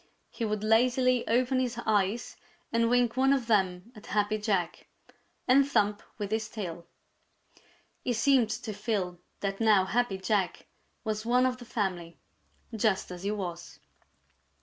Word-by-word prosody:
He 230 Hz, -, -3 dB
would 210 Hz, -1 st, -2 dB
lazily 250 Hz, +3 st, +3 dB
open 255 Hz, +3 st, +2 dB
his 250 Hz, -2 st, -1 dB
eyes 210 Hz, +2 st, 0 dB, 0.4 s
and 230 Hz, 0 st, +3 dB
wink 245 Hz, -1 st, +2 dB
one 265 Hz, +1 st, +3 dB
of 270 Hz, -3 st, +2 dB
them 190 Hz, -2 st, +1 dB
at 210 Hz, -, -13 dB
Happy 210 Hz, +1 st, 0 dB
Jack 195 Hz, -5 st, -1 dB, 0.6 s
and 270 Hz, +2 st, +5 dB
thump 210 Hz, -6 st, +1 dB, 0.2 s
with 205 Hz, -1 st, -4 dB
his 220 Hz, 0 st, -1 dB
tail. 175 Hz, -5 st, -6 dB, 1.2 s
He 245 Hz, -, 0 dB
seemed 240 Hz, 0 st, +3 dB
to 215 Hz, 0 st, -4 dB
feel 200 Hz, -4 st, -2 dB, 0.2 s
that 195 Hz, -1 st, -2 dB
now 215 Hz, -4 st, +4 dB
Happy 220 Hz, 0 st, 0 dB
Jack 190 Hz, -1 st, -1 dB, 0.4 s
was 215 Hz, -2 st, -2 dB
one 250 Hz, +2 st, +3 dB
of 255 Hz, -1 st, 0 dB
the 245 Hz, -, -11 dB
family, 180 Hz, -7 st, -3 dB, 0.6 s
just 215 Hz, -4 st, 0 dB
as 180 Hz, -1 st, -7 dB
he 200 Hz, -, -2 dB
was. 180 Hz, -5 st, -5 dB
215 Hz, 150 wpm, -29 LUFS, 195-245 Hz, 1.2 s, and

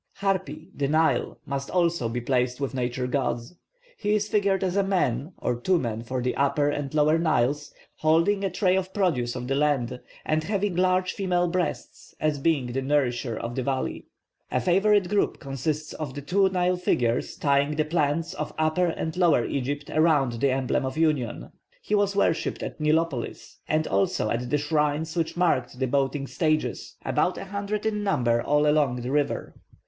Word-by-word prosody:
+Hapi+, 190 Hz, -4 st, -2 dB
the 140 Hz, -, 0 dB
Nile, 155 Hz, 0 st, +1 dB
must 140 Hz, 0 st, -4 dB
also 170 Hz, -9 st, +1 dB
be 120 Hz, +2 st, -2 dB
placed 125 Hz, 0 st, 0 dB
with 140 Hz, -1 st, -2 dB
Nature 125 Hz, 0 st, -2 dB
gods. 125 Hz, 0 st, -2 dB, 0.4 s
He 210 Hz, +1 st, +1 dB
is 210 Hz, 0 st, 0 dB
figured 200 Hz, -2 st, +1 dB
as 185 Hz, -1 st, -1 dB
a 200 Hz, -, +4 dB
man, 170 Hz, -6 st, 0 dB
or 125 Hz, -, -1 dB
two 185 Hz, +7 st, +3 dB
men 115 Hz, -7 st, -2 dB
for 125 Hz, +2 st, -3 dB
the 125 Hz, -, -1 dB
Upper 145 Hz, +1 st, +2 dB
and 145 Hz, -2 st, -3 dB
Lower 155 Hz, +2 st, +4 dB
Niles, 145 Hz, -2 st, +1 dB, 0.3 s
holding 165 Hz, +6 st, +2 dB
a 195 Hz, -, +1 dB
tray 185 Hz, +1 st, +2 dB
of 190 Hz, 0 st, -2 dB
produce 135 Hz, -, +1 dB
of 125 Hz, -1 st, -5 dB
the 135 Hz, -, 0 dB
land, 135 Hz, -4 st, 0 dB, 0.3 s
and 155 Hz, 0 st, +1 dB
having 200 Hz, 0 st, -1 dB
large 185 Hz, 0 st, +2 dB
female 180 Hz, -2 st, +1 dB
breasts 180 Hz, 0 st, -4 dB
as 155 Hz, -2 st, 0 dB
being 135 Hz, -5 st, +1 dB
the 135 Hz, -, -1 dB
nourisher 130 Hz, -4 st, 0 dB
of 115 Hz, +1 st, -4 dB
the 130 Hz, -, -2 dB
valley. 130 Hz, +1 st, -2 dB, 0.4 s
A -, -, 0 dB
favourite 195 Hz, +2 st, +3 dB
group 205 Hz, +2 st, 0 dB
consists 150 Hz, +2 st, -3 dB
of 145 Hz, -4 st, -6 dB
the 145 Hz, -, -5 dB
two 190 Hz, +5 st, +3 dB
Nile 180 Hz, -1 st, +1 dB
figures 120 Hz, -9 st, 0 dB
tying 140 Hz, +1 st, +2 dB
the 155 Hz, 0 st, +1 dB
plants 155 Hz, +1 st, 0 dB
of 155 Hz, -, -5 dB
Upper 155 Hz, +3 st, +2 dB
and 160 Hz, -1 st, -3 dB
Lower 170 Hz, -9 st, +3 dB
Egypt 145 Hz, +2 st, -3 dB
around 145 Hz, -7 st, +2 dB
the 140 Hz, -, +4 dB
emblem 130 Hz, +1 st, 0 dB
of 130 Hz, +2 st, -4 dB
union. 150 Hz, -7 st, 0 dB, 0.3 s
He -, -, -5 dB
was 205 Hz, -1 st, +2 dB
worshipped 170 Hz, -4 st, 0 dB
at -, -, -6 dB
Nilopolis, 155 Hz, -4 st, -1 dB
and 155 Hz, 0 st, +1 dB
also 100 Hz, +2 st, 0 dB
at 120 Hz, +1 st, -2 dB
the 150 Hz, -, +2 dB
shrines 150 Hz, +2 st, 0 dB
which 165 Hz, 0 st, -1 dB
marked 130 Hz, -9 st, +1 dB
the 130 Hz, -, 0 dB
boating 140 Hz, +1 st, 0 dB
stages, 155 Hz, +1 st, -1 dB
about -, -, +1 dB
a -, -, -6 dB
hundred 200 Hz, +2 st, -3 dB
in 210 Hz, -1 st, 0 dB
number 120 Hz, -12 st, +2 dB
all 150 Hz, +3 st, +2 dB
along 145 Hz, -5 st, +2 dB
the 125 Hz, +2 st, -4 dB
river. 145 Hz, 0 st, -1 dB
150 Hz, 185 wpm, -26 LUFS, 130-180 Hz, 0.4 s, a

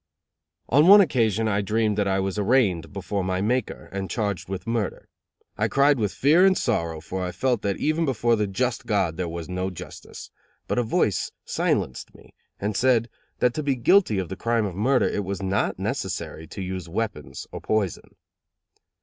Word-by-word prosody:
On 145 Hz, +6 st, +4 dB
one 205 Hz, +2 st, +10 dB
occasion 115 Hz, -, +2 dB
I 100 Hz, -1 st, +1 dB
dreamed 110 Hz, +1 st, 0 dB
that 100 Hz, -, +1 dB
I 95 Hz, 0 st, +1 dB
was 95 Hz, +1 st, -2 dB
arraigned 100 Hz, -6 st, +2 dB
before 100 Hz, 0 st, -3 dB
my 95 Hz, 0 st, -1 dB
Maker 115 Hz, +4 st, -1 dB
and 95 Hz, -1 st, -4 dB
charged 100 Hz, -6 st, -2 dB
with 95 Hz, 0 st, -5 dB
murder. 115 Hz, -3 st, -2 dB, 0.5 s
I 110 Hz, -, +2 dB
cried 140 Hz, +4 st, +3 dB
with 105 Hz, -3 st, 0 dB
fear 155 Hz, +7 st, +4 dB
and 190 Hz, -1 st, +5 dB
sorrow, 85 Hz, -9 st, -1 dB
for 95 Hz, +3 st, -4 dB
I 90 Hz, -, -3 dB
felt 120 Hz, +5 st, 0 dB
that 100 Hz, -1 st, -1 dB
even 155 Hz, +2 st, 0 dB
before 120 Hz, -3 st, +2 dB
the 105 Hz, -2 st, 0 dB
just 120 Hz, +5 st, -2 dB
God 95 Hz, -7 st, +1 dB
there 90 Hz, -1 st, -3 dB
was 85 Hz, -1 st, -6 dB
no 90 Hz, +1 st, -2 dB
justice; 90 Hz, -, -10 dB, 0.4 s
but -, -, 0 dB
a -, -, +4 dB
voice 110 Hz, -, 0 dB
silenced 65 Hz, -, -1 dB
me -, -, -18 dB, 0.3 s
and 105 Hz, +1 st, -2 dB
said 120 Hz, -2 st, +2 dB, 0.3 s
that 125 Hz, -1 st, +2 dB
to 155 Hz, -, -2 dB
be 140 Hz, -2 st, 0 dB
guilty 130 Hz, -, +3 dB
of 95 Hz, -3 st, -2 dB
the 95 Hz, -, -4 dB
crime 115 Hz, +1 st, 0 dB
of 95 Hz, -, -4 dB
murder, 125 Hz, +6 st, +2 dB
it 105 Hz, -, -2 dB
was 95 Hz, 0 st, -4 dB
not 95 Hz, +1 st, 0 dB
necessary 80 Hz, +1 st, -4 dB
to 95 Hz, -, -6 dB
use 95 Hz, -2 st, -5 dB
weapons 85 Hz, -, -4 dB
or -, -, -7 dB
poison. 105 Hz, -5 st, -2 dB
105 Hz, 190 wpm, -24 LUFS, 95-120 Hz, 0.5 s, one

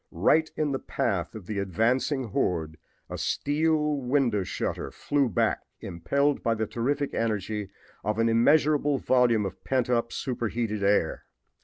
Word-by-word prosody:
Right 155 Hz, -, +2 dB
in 150 Hz, -2 st, 0 dB
the 135 Hz, -, -1 dB
path 95 Hz, -6 st, -2 dB
of 105 Hz, -5 st, -8 dB
the 105 Hz, +1 st, -3 dB
advancing 120 Hz, -, 0 dB
horde 80 Hz, -5 st, -1 dB, 0.3 s
a -, -, -6 dB
steel 150 Hz, 0 st, +1 dB
window 125 Hz, -5 st, +1 dB
shutter -, -, -3 dB
flew 140 Hz, -3 st, 0 dB
back, 95 Hz, -, +1 dB, 0.2 s
impelled 140 Hz, -, 0 dB
by 115 Hz, -3 st, +1 dB
the 110 Hz, 0 st, -1 dB
terrific 140 Hz, +6 st, -2 dB
energy 105 Hz, -2 st, -2 dB, 0.3 s
of 105 Hz, 0 st, -1 dB
an 115 Hz, 0 st, +2 dB
immeasurable 145 Hz, +4 st, +3 dB
volume 120 Hz, -5 st, +3 dB
of 95 Hz, -, -7 dB
pent 130 Hz, -1 st, 0 dB
up 115 Hz, -1 st, +1 dB
superheated 115 Hz, -4 st, -2 dB
air. 100 Hz, -5 st, +1 dB
120 Hz, 145 wpm, -27 LUFS, 105-140 Hz, 0.3 s, immeasurable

